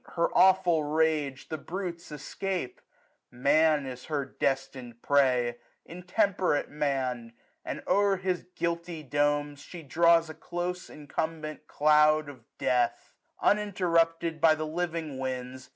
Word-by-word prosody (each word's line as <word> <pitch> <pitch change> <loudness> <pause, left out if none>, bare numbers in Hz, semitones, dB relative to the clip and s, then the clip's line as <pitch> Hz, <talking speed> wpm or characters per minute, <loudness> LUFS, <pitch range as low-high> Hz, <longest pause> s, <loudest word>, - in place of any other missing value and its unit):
Her 170 -1 +2
aweful 185 -4 +4
rage 150 -4 0
The 155 - -4
brutes 175 -1 -6
escape: 175 +1 -4 0.5
Man 150 +3 +3
is 125 -1 -7
her 145 -3 -2
destin'd 130 -3 -3
prey 125 -4 +2 0.3
j - - -11
Intemperate 180 -2 0
Man! 130 -5 -2 0.3
and, - - -5
o'er 200 -1 +3
his 185 -2 -2
guilty 170 -1 -3
domes, 145 +1 0
1060 - - -16
She 175 -2 -9
draws 170 +3 +4
a - - -9
close 180 +3 -5
incumbent 155 +1 -5
cloud 150 0 +4
of 140 - -13
death; 125 -2 0 0.3
Uninterrupted 170 -5 +1
by 160 -1 +6
the 155 0 -3
living 160 -3 -3
winds. 130 0 -5
155 Hz, 125 wpm, -28 LUFS, 140-170 Hz, 0.5 s, by